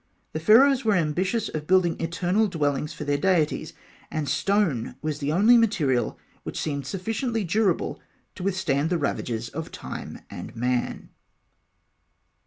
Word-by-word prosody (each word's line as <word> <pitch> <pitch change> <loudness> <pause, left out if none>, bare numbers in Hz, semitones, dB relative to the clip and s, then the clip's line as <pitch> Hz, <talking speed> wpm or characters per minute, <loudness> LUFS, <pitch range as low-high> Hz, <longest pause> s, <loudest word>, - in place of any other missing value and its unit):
The 155 - -2
Pharaohs 255 - +6
were 215 -2 +3
ambitious 185 +7 0
of 150 -1 -5
building 180 -2 +3
eternal 175 +6 +1
dwellings 150 -4 -1
for - - -7
their 145 -1 0
deities, 180 -6 +1 0.4
and 155 -2 -3
stone 160 - +1
was 155 -1 -2
the 145 0 -1
only 215 +9 +6
material 170 - +1 0.2
which - - -5
seemed 140 -3 -3
sufficiently 225 - -2
durable 190 0 0 0.3
to - - -10
withstand 175 -6 0
the 175 - +1
ravages 120 -6 -2
of 160 +5 -6
time - - -7
and - - -8
man. 125 +1 -1
170 Hz, 140 wpm, -25 LUFS, 145-200 Hz, 0.4 s, Pharaohs